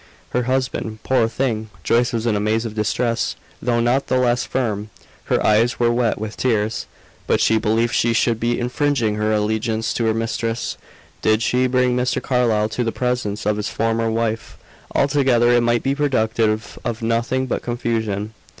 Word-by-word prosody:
Her 125 - +1
husband! 130 -4 -1
Poor 130 -4 +2
thing! 115 -2 -2
Joyce 120 +4 +2
was 115 -1 -2
in 115 -3 +2
a - - +1
maze 110 +2 0
of 110 - -4
distress, 115 +2 0 0.3
though 120 -1 +1
not 120 +4 +1
the 130 - +1
less 120 -1 +2
firm. 110 -5 -2 0.4
Her - - +1
eyes 115 +3 +3
were 120 -1 +3
wet 120 -1 +1
with 110 0 -6
tears; 110 -3 0 0.4
but - - +2
she 110 - +3
believed 115 +3 +1
she 120 - +2
should 115 0 +1
be 120 +1 0
infringing 125 -2 0
her 105 0 0
allegiance 110 +1 0
to 115 - -1
her 110 - +2
mistress 115 +1 -2 0.5
did 110 +1 +2
she 125 +2 +2
bring 125 -1 +2
Mr. 125 0 0
Carlyle 115 -4 +1
to 110 +3 -2
the 115 - -1
presence 125 -5 -2
of 105 0 +1
his 105 - -2
former 115 0 0
wife; 115 0 -2 0.4
altogether 135 -4 +3
it 120 0 +4
might 120 0 +1
be 135 - +1
productive 110 -6 0
of 120 -1 -3
nothing 115 +3 0
but 130 - -2
confusion. 110 -3 -2
115 Hz, 175 wpm, -21 LUFS, 110-125 Hz, 0.5 s, it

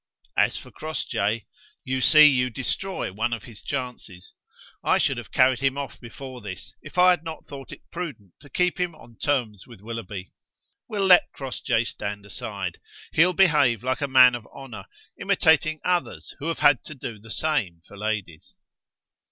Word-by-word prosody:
As - - +3
for - - -10
Crossjay, 115 -8 -2 0.4
you 130 0 -2
see 155 +3 +8
you 130 -3 +4
destroy 135 - -3
one 115 +4 -1
of 115 - -4
his 110 -3 -11
chances. 115 -8 -6 0.5
I - - +3
should - - +1
have - - -8
carried 130 -1 +4
him 135 0 +1
off 140 -1 -5
before 130 +1 -9
this, 95 -4 -8
if - - -12
I 180 0 +7
had 175 -3 0
not 160 -1 -7
thought 135 -2 -10
it - - -11
prudent 140 - -6
to 145 - -16
keep 180 +3 0
him 175 -2 -1
on 115 -7 -17
terms 120 -9 -1
with 115 -5 -13
Willoughby. 105 -3 -7 0.6
We'll 200 -2 0
let 180 -2 +6
Crossjay 130 -3 -1
stand 105 -3 -5
aside. 100 - -5 0.3
He'll 180 +3 +4
behave 150 - +4
like 130 +3 -1
a 145 - 0
man 130 -2 +7
of 120 -3 -6
honour, 120 -8 -10 0.3
imitating 155 0 +3
others 180 -1 -1
who 150 - -4
have 165 - -1
had 145 - +6
to 155 - -8
do 115 -4 -7
the 115 +2 -15
same 110 - -1
for - - -13
ladies." 100 -6 -4
130 Hz, 175 wpm, -25 LUFS, 110-155 Hz, 0.6 s, see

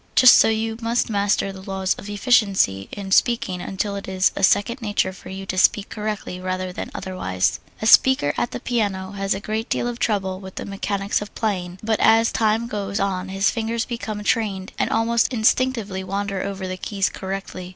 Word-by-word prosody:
Just 255 -1 +9
so - - +6
you 225 0 -1
must 230 0 0
master 200 -1 +1
the 190 - -10
laws 190 0 -1
of 200 - -10
efficiency 200 - +2
in 195 -1 -6
speaking 190 -5 +2
until 200 +2 -3
it 200 - -6
is 190 0 +2
a - - -3
second 205 +6 +2
nature 205 -3 0
for 185 - -12
you 190 +1 -6
to 185 -1 -2
speak 205 +2 +3
correctly 210 -4 -4
rather 185 0 -3
than - - -5
otherwise. 95 - -1 0.2
A - - +1
beginner 260 - +1
at - - -1
the - - -6
piano 200 -6 -1
has 195 -1 -1
a - - -4
great 220 +3 -3
deal - - 0
of 240 0 -4
trouble 190 -5 -1
with 190 -1 -10
the - - -5
mechanics 200 0 -2
of 205 - -8
playing, 185 -5 -2
but 220 0 0
as 225 +1 +5
time 220 +1 +1
goes 205 -3 -3
on 190 -1 -1
his 195 +1 +1
fingers 230 0 -2
become 215 -3 -5
trained 205 -4 -1
and - - +1
almost 230 +2 +2
instinctively 225 -4 +1
wander 195 0 -3
over 195 -1 -4
the 185 0 -4
keys 195 +1 -1
correctly. 190 -1 -6
200 Hz, 195 wpm, -22 LUFS, 190-220 Hz, 0.2 s, Just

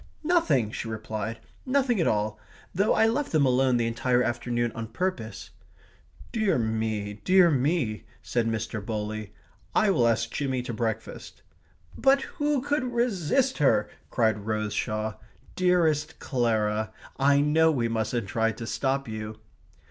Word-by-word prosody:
"Nothing!" 155 - +2
she 115 - -5
replied. 110 0 -4 0.3
"Nothing 255 -6 +1
at - - +2
all 105 0 0 0.3
though 200 +4 +2
I 225 - +4
left 260 +6 0
them 155 -3 +3
alone 130 -1 +3
the 120 - +1
entire 125 +2 +1
afternoon 120 0 -1
on 115 -1 -5
purpose." 110 - -4 0.8
"Dear 215 - +1
me, 110 -2 -2
dear 185 -2 +5
me," 135 -5 0 0.2
said 120 -2 0
Mr. 110 -1 -3
Bowley. 105 -1 -4 0.4
"I 215 -2 +4
will 120 -10 +3
ask 115 0 +1
Jimmy 130 -3 -2
to 125 - -5
breakfast." 110 0 -4 0.5
"But 270 0 +3 0.2
who 290 -3 +1
could 290 -1 0
resist 240 - 0
her?" 145 - +3 0.2
cried 110 -3 0
Rose 110 -1 -1
Shaw. 110 0 -2 0.4
"Dearest 165 -5 +2
Clara 110 -3 0 0.3
I 140 +1 +4
know 160 +2 +4
we 120 -6 0
mustn't 115 0 -1
try 115 +3 +1
to 115 - -7
stop 135 +3 -1
you..." 110 -1 -6
120 Hz, 140 wpm, -27 LUFS, 110-170 Hz, 0.8 s, dear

